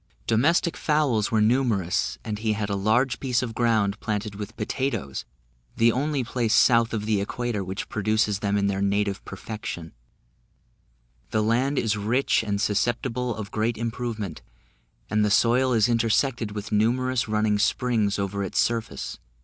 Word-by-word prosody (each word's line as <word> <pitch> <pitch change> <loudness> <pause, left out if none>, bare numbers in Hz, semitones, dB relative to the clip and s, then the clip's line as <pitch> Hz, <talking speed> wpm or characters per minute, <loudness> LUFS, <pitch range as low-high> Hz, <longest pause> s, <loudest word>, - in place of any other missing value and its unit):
Domestic 155 +9 +2
fowls 145 -9 +1
were 110 -1 +2
numerous, 110 -6 +1
and 105 -1 -3
he 110 -1 0
had 105 -1 -3
a - - 0
large 120 +6 +1
piece 130 -2 0
of 115 -3 -4
ground 110 -3 +1
planted 105 -1 -3
with 105 +2 -8
potatoes, 115 - -3 0.5
the 115 +1 +4
only 140 +2 -1
place 120 -2 0
south 115 -1 +5
of 105 -2 -2
the 105 -2 +1
Equator 115 0 -2
which 95 +1 -5
produces 110 -1 0
them 100 0 0
in 100 - +1
their 100 -1 0
native 100 0 0
perfection; 100 -4 -7 1.4
the 110 -1 +1
land 125 +6 +1
is 110 -2 +1
rich 115 +7 +1
and 100 -2 -2
susceptible 120 +3 0
of 105 -2 -7
great 110 +2 -1
improvement; 115 -5 -4 0.7
and 105 0 +1
the 105 - +2
soil 120 +5 +3
is 115 -2 +4
intersected 115 -1 +1
with 105 +1 -6
numerous 120 +4 +1
running 105 -1 +1
springs 110 -2 +1
over 100 0 -2
its 95 - -4
surface. 115 -1 -1
110 Hz, 155 wpm, -25 LUFS, 105-120 Hz, 1.4 s, south